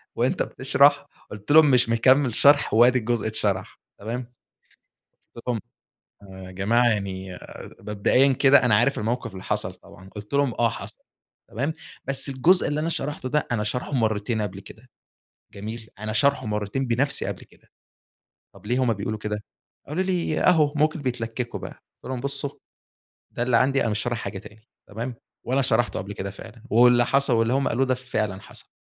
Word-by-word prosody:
وأنت - - +1
بتَشْرح - - +3 0.3
قُلت 105 +6 -6
لهم 155 -2 +7
مش 125 -2 +4
مكمّل 130 +1 +3
شرْح 145 -5 +4
وأدي 120 +3 +5
الجزء 115 -1 -1
اتْشَرح 100 -3 -2 0.2
تمام؟ 120 +4 -4 1.1
قُلت 115 - -10
لهم: 120 -3 0 0.9
يا 90 - -10
جماعة 115 +6 +2
يعني 95 -4 -3 0.4
مبدئيًا 115 +6 +2
كده 135 +1 +5
أنا 115 -4 +4
عارف 140 +6 +2
الموقف 115 0 -2
اللي 95 0 -9
حصل - - -2
طبعًا 95 +1 -16
قُلت 105 +5 -9
لهم: 140 -4 +2
"آه 120 -1 +4
حصل - - -8 0.5
تمام 140 +8 -2 0.3
بس 135 +1 +2
الجزء 150 +8 +3
اللي 150 +1 -1
أنا 165 - -1
شَرَحْته 145 -4 -3
ده 150 +3 0
أنا 105 -3 0
شَرْحه 125 +6 -3
مرتين 110 -2 0
قبل 100 -1 -5
كده، 110 +5 -15 0.6
جميل 110 +2 -7
أنا 110 0 -4
شَرْحه 130 +2 +2
مرتين 105 +5 -2
بنَفْسي 125 +4 0
قبل - - -5
كده - - -25 0.9
طب 105 - -15
ليه 125 +3 0
هُم 120 - +2
بيقولوا 110 +1 -4
كده؟" 105 0 -4 0.4
قالوا 165 +6 -1
لي: 180 -4 -1
"أهو 155 -5 +4
ممكن 155 0 +1
بيتْلكّكوا 120 -1 -4
بقى" - - -6 0.3
قُلت - - -6
لهم: 130 -2 -3
"بُصّوا 140 +1 -2 0.8
ده 120 - -2
اللي 120 -2 +3
عندي 135 +2 +2
أنا 115 - 0
مش 105 - -1
شارِح 120 +1 -2
حاجة 100 -2 -5
تاني 110 +4 -16 0.2
تمام؟" 115 +4 -5 0.3
وأنا 130 +3 +1
شَرَحْته 120 -2 +1
قبل 100 +2 -6
كده 95 0 -5
فعلًا 110 +3 -13
واللي 120 +1 +5
حصل 140 -1 +2
واللي 115 +1 +2
هم 135 +1 +1
قالوه 135 +3 +1
ده 130 -1 +1
فعلًا 110 -6 -3
حصل، - - -9
120 Hz, 175 wpm, -24 LUFS, 105-135 Hz, 1.1 s, لهم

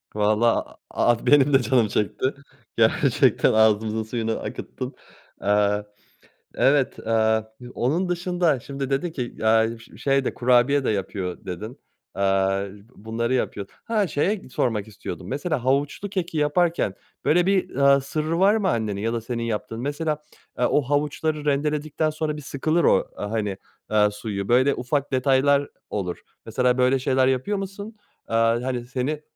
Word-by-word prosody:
Vallahi 110 +2 +2 0.2
a 120 - +3
a 115 - -7
benim 145 -1 +5
de 135 - +6
canım 125 -3 +2
çekti, 105 +4 -1 0.5
gerçekten. - - +3
Ağzımızın 110 0 +3
suyunu 115 0 -2
akıttın. - - -6 0.4
Aaa, 105 0 +2 0.7
evet, 135 -1 +2
aaa, 110 -1 +1 0.2
onun 170 +9 0
dışında 175 -5 +1
şimdi 135 +1 -5
dedin 140 +5 -1
ki, 125 -6 -5
"Aaa, 110 +1 +3
ş 115 - -16
şey 135 -1 +1
de, - - -1
kurabiye 125 +3 +3
de - - 0
yapıyor." 95 -3 -3
dedin. 105 +8 -6 0.4
Aaa, 95 0 +1 0.3
bunları 115 +3 -2
yapıyor. 100 -6 -2 0.2
Ha, 215 -4 0
şeye 185 +4 -1
sormak 110 -5 -1
istiyordum. 105 - -8
Mesela, 145 -1 -2
havuçlu 140 +9 0
keki 175 -4 -3
yaparken 150 - +1 0.3
böyle 175 +3 +4
bir, 195 -1 +1
aaa, 140 0 +5
sırrı 155 +4 -2
var 200 +3 +5
mı 205 -4 +1
annenin 105 - -1
ya 115 +1 -1
da 115 - -2
senin 115 0 -4
yaptığın? 115 0 -3
Mesela, 150 +2 -2 0.4
aaa, 125 - +2
o 145 - +3
havuçları 150 +2 -1
rendeledikten 150 +2 0
sonra 155 0 -3
bir - - -7
sıkılır 155 +5 0
o, - - +3
aaa, 105 +1 -5
hani, 105 -4 -2 0.5
suyu. 105 -2 -5
Böyle 130 +4 +4
ufak 140 +3 -2
detaylar 140 +2 +3 0.2
olur, 90 -4 -4 0.2
mesela. 125 +2 +1
Böyle 130 +1 +3
şeyler 130 0 +2
yapıyor 135 +11 0
musun? 200 +3 -6 0.3
Aaa, 115 +1 +2
hani, 125 -2 -3
seni, 135 +4 -2
130 Hz, 150 wpm, -24 LUFS, 110-150 Hz, 0.7 s, de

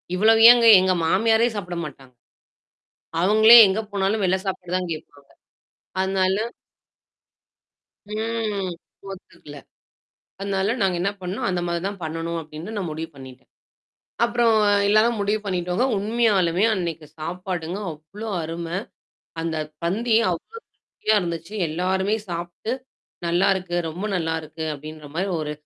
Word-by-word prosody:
இவ்வளவு 220 +4 +4
ஏங்க? 240 -1 +4
எங்க 185 0 +2
மாமியாரே 225 +6 +3
சாப்பிட 180 -4 -5
மாட்டாங்க. 135 -3 -12 1.1
அவங்களே 220 +5 +8
எங்க 190 +3 0
போனாலும் 200 +2 0
வெள்ள 185 0 +2
சாப்பாடு 180 -2 -4
தான் 180 -2 -3
கேட்பாங்க. 145 -2 -11 0.7
அதனால 190 0 +1 1.7
ம். 215 -2 -3 0.4
ஒத்துக்கல. 170 -5 -12 0.8
அதனால 195 +2 0
நாங்க 190 -2 +1
என்ன 200 - +1
பண்ணோம், 180 +3 -3
அந்த 180 -1 -1
மாதிரி 170 0 -2
தான் 200 -1 -5
பண்ணணும் 165 +1 -3
அப்டின்னு 160 +7 -8
நான் 185 -5 -3
முடிவு 160 +1 -5
பண்ணிட்டேன். 130 -1 -13 0.8
அப்புறம் 235 -1 +2 0.3
எல்லாராம் 220 +2 +3
முடிவு 205 +2 0
பண்ணிடோங்க. 180 +3 -1
உண்மையாலுமே 205 -4 +2
அன்னைக்கு 170 -5 -4
சாப்பாடுங்க 180 +2 -4
அவ்ளோ 170 +9 -9
அருமை. 165 +2 -4 0.6
அந்த 165 -1 -2 0.3
பந்தி 220 +7 0 0.2
அவ்ளோ 180 - -6
அருமையா 220 - -3
இருந்துச்சு. 170 +2 -5
எல்லாருமே 190 +5 0
சாப்பிட்டு, 175 +6 -5 0.5
நல்லாருக்கு. 180 +1 +1
ரொம்ப 175 +6 -6
நல்லாருக்கு! 160 -1 -3
அப்டின்ற 155 +1 -10
மாரி 190 +3 -1
ஒரு 150 -1 -3
185 Hz, 115 wpm, -23 LUFS, 165-205 Hz, 1.7 s, அவங்களே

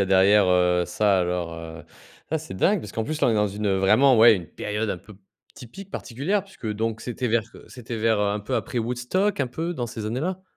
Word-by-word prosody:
a - - +2
derrière, 95 +1 +5
heu, 90 -1 +3
ça 100 -1 +2
alors, 90 -2 -2
heu, 80 0 -9 0.5
ah 160 - +1
ça 155 - -9
dingue! 185 - +2
Parce 105 - -9
qu'en 110 - -2
plus, 155 +4 -3
là - - +5
on - - +4
est 115 - +1
dans 105 0 +2
une, 105 +2 -6
heu, 95 -1 +2
vraiment, 115 +6 +5
ouais, 115 0 +8
une 85 -3 -7
période 105 0 -3
un 90 - -3
peu 105 +3 -15
p 100 - -24 0.3
typique 190 - -11
particulière 160 - -2
puisque 195 - -11
donc 110 +1 -2
c'était 125 +1 -4
vers, 115 -1 +1
heu, - - -13
c'était 120 -2 -7
vers, 110 -1 +1
heu, 100 - +1
un 105 +1 -2
peu 105 - -4
après - - -3
Woodstock, 125 - -1
un 130 - +1
peu 165 +8 -4
dans 125 -8 -3
ces 110 -1 -7
années 115 +5 -2
là? 185 +3 -3
110 Hz, 255 wpm, -24 LUFS, 100-130 Hz, 0.5 s, ouais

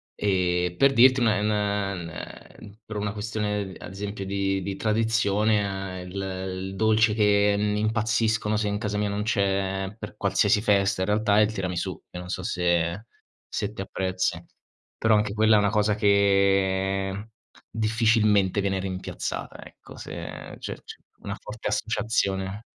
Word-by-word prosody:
Ehm, 90 -3 0
per 140 0 +5
dirti 130 +1 +6
un - - +3
è 105 -1 +2
n 105 - +1
n 100 -4 -1
ehm, 100 +4 -11
per 110 - -6
una 105 0 -2
questione, 105 -2 -3
ad - - -9
esempio 100 +1 -5
di 95 0 -1
di 100 +1 -4
tradizione 105 -3 0
il 90 - -10
il 95 0 -4
dolce 110 +1 +3
che 105 -1 +3
n 105 0 0
impazziscono 110 0 +1
se 105 0 0
in 100 0 -1
casa 105 -1 -2
mia 105 - 0
non 100 +1 -2
c'è 95 -2 0
per - - -8
qualsiasi 105 - +2
festa 100 -3 +2
in 95 - 0
realtà 105 0 +3
è - - +7
il 105 - 0
tiramisù, 90 -4 -3
che 90 - -7
non 90 0 -8
so 95 0 -3
se 85 +2 0 0.4
se 105 +1 -3
te 95 - -6
apprezzi. 95 -1 -2 0.5
Però 110 -1 +3
anche 105 -1 +1
quella 110 +1 +4
è - - +5
una 100 0 +2
cosa 105 -1 +2
che 100 -1 +2 0.4
difficilmente 110 -3 +2
viene 95 -1 0
rimpiazzata, 95 -1 -5
ecco. - - -14
Se - - -9
c'è - - -7 0.2
c'è - - -12 0.2
una 100 - -5
forte 105 +1 -5
associazione. 105 -2 -1
100 Hz, 160 wpm, -25 LUFS, 95-110 Hz, 0.5 s, è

